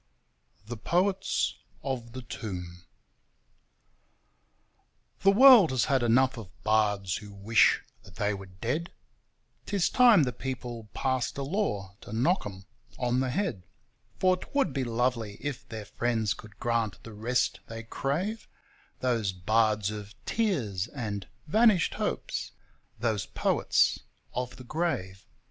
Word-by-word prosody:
The 120 Hz, +2 st, -6 dB
Poets 185 Hz, -, 0 dB, 0.2 s
of 120 Hz, -4 st, -4 dB
the 130 Hz, 0 st, -7 dB
Tomb 90 Hz, -6 st, -7 dB, 2.3 s
The 195 Hz, -, +4 dB
world 240 Hz, -, +9 dB
has 130 Hz, -3 st, +1 dB
had 135 Hz, -3 st, +2 dB
enough 130 Hz, +3 st, +3 dB
of 105 Hz, -5 st, -9 dB
bards 105 Hz, -4 st, +2 dB
who 105 Hz, -1 st, -10 dB
wish 100 Hz, +3 st, +3 dB, 0.2 s
that 95 Hz, -3 st, -16 dB
they 105 Hz, -1 st, 0 dB
were 95 Hz, -1 st, -7 dB
dead, 120 Hz, -, -3 dB, 0.8 s
'Tis 200 Hz, -4 st, +1 dB
time 235 Hz, -, +6 dB
the 125 Hz, -2 st, -1 dB
people 120 Hz, -4 st, -6 dB
passed 130 Hz, -2 st, -1 dB
a 140 Hz, -, -2 dB
law 135 Hz, -, -2 dB
to -, -, -11 dB
knock 130 Hz, -, +2 dB
'em 95 Hz, -1 st, -10 dB, 0.3 s
on 125 Hz, 0 st, +1 dB
the 130 Hz, 0 st, 0 dB
head, 130 Hz, -, -1 dB, 0.6 s
For 185 Hz, 0 st, +3 dB
'twould 230 Hz, -, -1 dB
be 135 Hz, -, 0 dB
lovely 115 Hz, -3 st, -1 dB
if 145 Hz, -2 st, -5 dB
their 110 Hz, -2 st, -6 dB
friends 115 Hz, -3 st, 0 dB
could 105 Hz, -2 st, -14 dB
grant 115 Hz, -4 st, -1 dB
the 115 Hz, -, -10 dB
rest 120 Hz, +4 st, 0 dB
they 115 Hz, 0 st, -7 dB
crave 170 Hz, -, -2 dB, 0.3 s
— -, -, -33 dB
Those 115 Hz, -6 st, +1 dB
bards 105 Hz, +2 st, +1 dB
of 105 Hz, -1 st, -8 dB
'tears' 120 Hz, -, 0 dB
and 105 Hz, -7 st, -5 dB, 0.2 s
'vanished 210 Hz, +1 st, +4 dB
hopes', -, -, -3 dB, 0.4 s
those 110 Hz, -3 st, -1 dB
poets -, -, +2 dB, 0.3 s
of 125 Hz, 0 st, -3 dB
the 125 Hz, -, -11 dB
grave. 120 Hz, -, -3 dB
120 Hz, 135 wpm, -29 LUFS, 105-140 Hz, 2.3 s, world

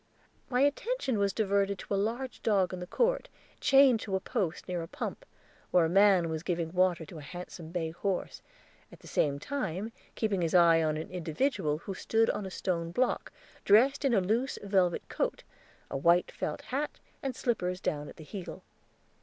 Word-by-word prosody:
My 250 Hz, 0 st, +2 dB
attention 285 Hz, -, +1 dB
was 200 Hz, -1 st, +2 dB
diverted 200 Hz, -1 st, +1 dB
to 200 Hz, -, -5 dB
a -, -, +3 dB
large 235 Hz, +6 st, -2 dB
dog 195 Hz, -4 st, +2 dB
in 185 Hz, -, -4 dB
the 180 Hz, -, -6 dB
court, -, -, +1 dB, 0.3 s
chained 270 Hz, -4 st, +6 dB
to 195 Hz, -2 st, -3 dB
a -, -, +1 dB
post 185 Hz, -2 st, -2 dB
near 180 Hz, -2 st, -2 dB
a 165 Hz, -, -6 dB
pump, -, -, -5 dB, 0.4 s
where 175 Hz, -2 st, +4 dB
a -, -, 0 dB
man 195 Hz, -2 st, +5 dB
was 160 Hz, -1 st, -3 dB
giving 170 Hz, -1 st, -2 dB
water 180 Hz, -2 st, +2 dB
to 155 Hz, +1 st, -10 dB
a -, -, -9 dB
handsome 175 Hz, +1 st, -8 dB
bay 165 Hz, -2 st, -2 dB
horse, 185 Hz, +3 st, -3 dB, 0.5 s
at -, -, -15 dB
the -, -, -16 dB
same 140 Hz, -2 st, +1 dB
time 220 Hz, -, -3 dB, 0.2 s
keeping 205 Hz, -5 st, 0 dB
his 165 Hz, +1 st, 0 dB
eye 170 Hz, -2 st, +6 dB
on 155 Hz, -1 st, 0 dB
an 155 Hz, -, -6 dB
individual 165 Hz, -, -1 dB
who 195 Hz, +5 st, -6 dB
stood 225 Hz, +4 st, +2 dB
on 200 Hz, -, -4 dB
a -, -, -5 dB
stone 170 Hz, -3 st, -2 dB
block, 250 Hz, +9 st, 0 dB, 0.3 s
dressed 255 Hz, +8 st, +5 dB
in 265 Hz, -4 st, +3 dB
a 195 Hz, -, +4 dB
loose 230 Hz, +8 st, 0 dB
velvet 190 Hz, -3 st, +1 dB
coat, -, -, -2 dB, 0.5 s
a -, -, -1 dB
white 170 Hz, +5 st, +3 dB
felt 150 Hz, -, -4 dB
hat, 285 Hz, +3 st, -3 dB, 0.2 s
and 270 Hz, -2 st, -3 dB
slippers 180 Hz, -7 st, -1 dB
down 145 Hz, -4 st, -2 dB
at -, -, -11 dB
the 160 Hz, -, -11 dB
heel. 185 Hz, +3 st, -8 dB
190 Hz, 190 wpm, -30 LUFS, 170-225 Hz, 0.5 s, chained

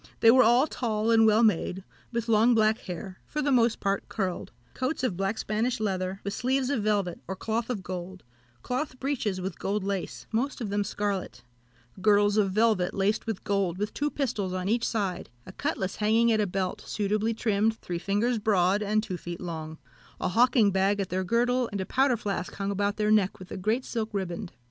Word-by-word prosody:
They 225 Hz, -, +8 dB
were 255 Hz, +2 st, +6 dB
all 240 Hz, +4 st, +5 dB
tall 225 Hz, -6 st, -1 dB
and 225 Hz, -1 st, +6 dB
well 220 Hz, +2 st, +5 dB
made, 190 Hz, -2 st, +1 dB, 0.3 s
with 235 Hz, -1 st, -2 dB
long 230 Hz, +2 st, +4 dB
black 220 Hz, 0 st, +3 dB
hair, 185 Hz, +1 st, -7 dB
for 300 Hz, -, -4 dB
the 285 Hz, -1 st, +1 dB
most 235 Hz, -3 st, +3 dB
part 195 Hz, -1 st, -1 dB
curled; 190 Hz, -4 st, -3 dB, 0.2 s
coats 260 Hz, +2 st, -2 dB
of 250 Hz, -8 st, 0 dB
black 195 Hz, +4 st, -1 dB
Spanish 225 Hz, +3 st, -1 dB
leather, 190 Hz, -2 st, -2 dB
with 200 Hz, -, -3 dB
sleeves 260 Hz, +4 st, 0 dB
of 260 Hz, -6 st, 0 dB
velvet, 200 Hz, -4 st, 0 dB
or 190 Hz, -, -3 dB
cloth 225 Hz, +4 st, -2 dB
of 215 Hz, -7 st, -3 dB
gold; 185 Hz, 0 st, -6 dB, 0.4 s
cloth 255 Hz, 0 st, -3 dB
breeches 245 Hz, -9 st, -1 dB
with 185 Hz, -1 st, -5 dB
gold 200 Hz, +1 st, -1 dB
lace, 195 Hz, -2 st, -4 dB
most 255 Hz, +7 st, -1 dB
of 220 Hz, -5 st, -4 dB
them 205 Hz, 0 st, +1 dB
scarlet; 200 Hz, -5 st, -3 dB, 0.6 s
girdles 205 Hz, 0 st, +4 dB
of 205 Hz, -2 st, +3 dB
velvet, 215 Hz, -3 st, +2 dB
laced 200 Hz, +3 st, 0 dB
with 225 Hz, -4 st, -3 dB
gold, 195 Hz, -4 st, 0 dB
with 210 Hz, +2 st, -3 dB
two 295 Hz, +1 st, -1 dB
pistols 220 Hz, -11 st, -2 dB
on 185 Hz, 0 st, -2 dB
each 230 Hz, +3 st, +1 dB
side; 200 Hz, -5 st, -2 dB, 0.2 s
a -, -, -9 dB
cutlass 195 Hz, -, -3 dB
hanging 225 Hz, +2 st, +3 dB
at 215 Hz, -1 st, +3 dB
a 205 Hz, -, +1 dB
belt, 185 Hz, 0 st, -2 dB
suitably 215 Hz, +2 st, 0 dB
trimmed, 220 Hz, 0 st, +1 dB
three 175 Hz, -5 st, -5 dB
fingers 215 Hz, +6 st, 0 dB
broad 200 Hz, -1 st, +2 dB
and 215 Hz, +1 st, +1 dB
two 185 Hz, -4 st, -4 dB
feet 175 Hz, 0 st, -7 dB
long; 160 Hz, -3 st, -6 dB, 0.4 s
a -, -, 0 dB
hawking 230 Hz, 0 st, +4 dB
bag 195 Hz, +2 st, +2 dB
at 195 Hz, -, -2 dB
their 185 Hz, +1 st, -1 dB
girdle, 245 Hz, +5 st, +1 dB
and 200 Hz, -, -3 dB
a 190 Hz, -, -2 dB
powder 260 Hz, +1 st, +2 dB
flask 200 Hz, -4 st, -3 dB
hung 200 Hz, 0 st, -2 dB
about 200 Hz, +1 st, -1 dB
their 210 Hz, 0 st, +1 dB
neck 205 Hz, -3 st, +3 dB
with 185 Hz, -, -12 dB
a -, -, -4 dB
great 220 Hz, +7 st, 0 dB
silk 225 Hz, -2 st, -3 dB
riband. 185 Hz, 0 st, -3 dB
210 Hz, 205 wpm, -27 LUFS, 190-230 Hz, 0.6 s, They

